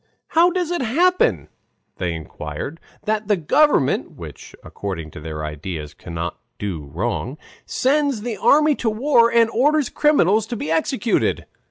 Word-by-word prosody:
"How 335 +2 +5
does 355 -1 -2
it 350 - -1
happen," 255 - +2 0.5
they 90 -2 -2
inquired, 80 - -7 0.2
"that 215 -1 -1
the 205 -2 +3
government 265 - +2
[which - - -11
according 85 -6 -6
to - - -9
their 75 0 -5
ideas 75 0 -6
cannot 85 0 -6 0.2
do 90 -8 -4
wrong] 120 - -3 0.3
sends 280 -3 +1
the 235 -2 -3
army 300 +1 +4
to 230 - 0
war 235 +1 +3
and 230 -1 +5
orders 290 +3 +2
criminals 220 - +3
to 240 - -4
be 160 -8 -4
executed." 225 +8 0
215 Hz, 145 wpm, -21 LUFS, -, 0.5 s, How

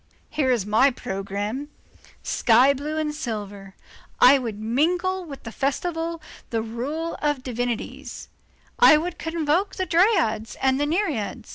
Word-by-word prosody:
Here 300 -4 0
is 240 -6 +1
my 220 +6 +4
programme: 210 +3 -4 0.5
sky 250 +3 +4
blue 295 +3 -4
and 305 -1 -1
silver. 205 -8 -6 0.4
I 270 +2 +7
would 225 -5 -5
mingle 350 - 0
with 280 -4 -10
the 230 - -7
festival 325 +5 -2 0.3
the 225 -1 -1
rural 280 +9 -4 0.3
divinities, 245 -2 -4 0.5
I 385 -10 +8
would 345 +3 -4
convoke 325 +3 0
the 375 - -1
Dryads 335 - +2
and 265 0 +1
the 290 - +1
Nereids. 290 - -2
275 Hz, 130 wpm, -24 LUFS, 225-325 Hz, 0.5 s, I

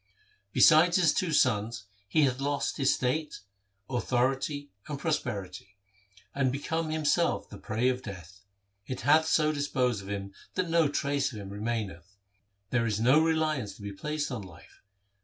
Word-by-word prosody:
Besides 165 - +6
his 170 -5 +4
two 180 -3 0
sons 115 -5 +1 0.2
he 150 +10 +3
hath 130 -1 +1
lost 145 0 -1
his 135 -2 +3
state, 145 +2 -1 0.5
authority, 135 +4 -1 0.2
and 145 - -4
prosperity, 100 - -4 0.6
and 135 -2 +1
become 160 +4 -2
himself 155 +2 +1
the - - -11
prey 115 +3 -1
of 130 0 0
death. 95 -2 -10 0.5
It 130 - -4
hath 155 +2 +4
so 155 -1 +3
dis 145 -1 -2
posed 125 -6 0
of 95 - -10
him 100 -1 -5 0.2
that 180 -2 -1
no 165 -2 +4
trace 140 -1 0
of 110 - -8
him 100 -1 -8
remaineth. 105 -4 -4 0.6
There 115 -2 +1
is 110 -2 -1
no 130 +7 +5
reliance 155 -8 0
to - - -13
be 100 -1 -5
placed 150 +7 -3
on 120 -4 -4
life. 95 -5 -15
130 Hz, 160 wpm, -29 LUFS, 105-155 Hz, 0.6 s, Besides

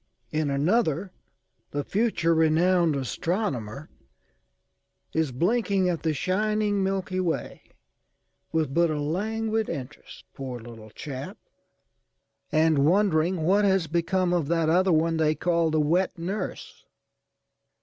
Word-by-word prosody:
In 155 -1 0
another 170 +4 +1 0.6
the 145 0 -3
future 190 -5 +1
renowned 165 +1 +3
astronomer 140 - -3 1.2
is 160 -4 0
blinking 195 - +1
at 170 -2 -2
the 160 - 0
shining 205 +5 0
Milky 190 -1 -1
Way 175 -3 -2 0.9
with 155 -4 0
but 170 +1 +3
a 155 -1 -2
languid 220 +8 -1
interest 135 +1 -8
poor 130 -3 -6
little 115 -2 -11
chap!â€"and 155 - -5
wondering 170 +1 +2
what 195 +5 +3
has 190 -3 +3
become 175 +3 0
of 170 -5 0
that 165 -1 +1
other 185 +3 +3
one 165 0 +2
they 155 -1 +2
call 170 -1 +1
the 155 0 +1
wet 175 +6 +1
nurse. 185 +5 -5
165 Hz, 115 wpm, -26 LUFS, 155-190 Hz, 1.2 s, renowned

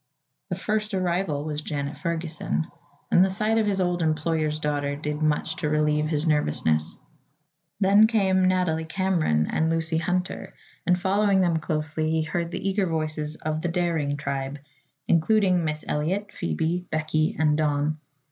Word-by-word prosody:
The - - -1
first 215 -1 -1
arrival 175 -5 0
was 150 -1 -3
Janet 145 -1 -3
Ferguson, 160 - -2 0.5
and 180 - +6
the 190 - +2
sight 215 +3 +1
of 215 - +1
his 195 -2 0
old 180 -1 0
employer's 155 -1 0
daughter 145 -2 -1
did 150 +1 -4
much 155 +1 0
to 155 - -1
relieve 150 0 +2
his 155 0 0
nervousness. 80 - +1 0.8
Then 205 +2 +6
came 190 -4 +2
Nathalie 180 -4 +1
Cameron 160 - +1
and 160 0 +1
Lucy 165 0 +1
Hunter 180 +2 -2 0.3
and 180 0 +3
following 195 +1 +2
them 170 -3 +2
closely 155 0 -1
he 160 0 +1
heard 170 +2 -2
the 180 - -4
eager 195 -1 +1
voices 155 -2 -2
of 155 0 -3
"the 175 - -1
Daring 165 -5 0
tribe," 140 -1 -3 0.5
including 180 +1 +3
Miss 155 -1 -3
Eliot, 185 +8 -1
Phoebe, 165 - -2
Becky 155 0 0
and 150 -1 +3
Don. 150 0 0
160 Hz, 155 wpm, -25 LUFS, 150-185 Hz, 0.8 s, and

